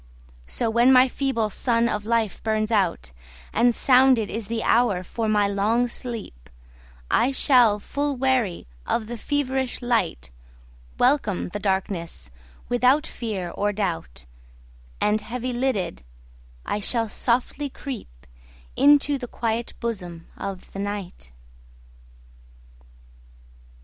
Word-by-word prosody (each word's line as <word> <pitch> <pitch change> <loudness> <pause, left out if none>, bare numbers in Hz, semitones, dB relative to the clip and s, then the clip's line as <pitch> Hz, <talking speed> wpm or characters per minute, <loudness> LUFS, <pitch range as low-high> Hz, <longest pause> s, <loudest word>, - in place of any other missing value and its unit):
So 235 - -1
when 240 +3 +5
my 255 0 +7
feeble 250 -5 -1
sun 235 +2 +2
of 210 -2 -3
life 230 -4 0
burns 215 0 0
out, 190 - 0 0.4
And 235 +1 +3
sounded 255 -4 +4
is 220 -1 -4
the 225 -1 -2
hour 225 -6 +2
for 220 +4 -3
my 210 -1 +3
long 215 +5 +1
sleep,I - - -4
shall, 245 -6 +4
full 285 +6 -2
weary 250 -8 0 0.2
of 230 - 0
the 240 +2 -6
feverish 265 0 -1
light, 225 - -1 0.7
Welcome 245 -9 +1
the 205 - -5
darkness 190 - -2 0.4
without 250 +5 +3
fear 195 -7 -4
or 205 +3 0
doubt, 165 - -4 0.7
And 210 +1 +2
heavy 250 +3 -4
lidded, 240 - -1 0.6
I 210 - -2
shall 225 +2 0
softly 250 +6 0
creepInto 65 - -1
the 245 - -6
quiet 230 0 -2
bosom 180 -8 -5
of 195 -2 -7
the 195 - -6
Night. 195 - -5
225 Hz, 115 wpm, -24 LUFS, 190-250 Hz, 0.7 s, my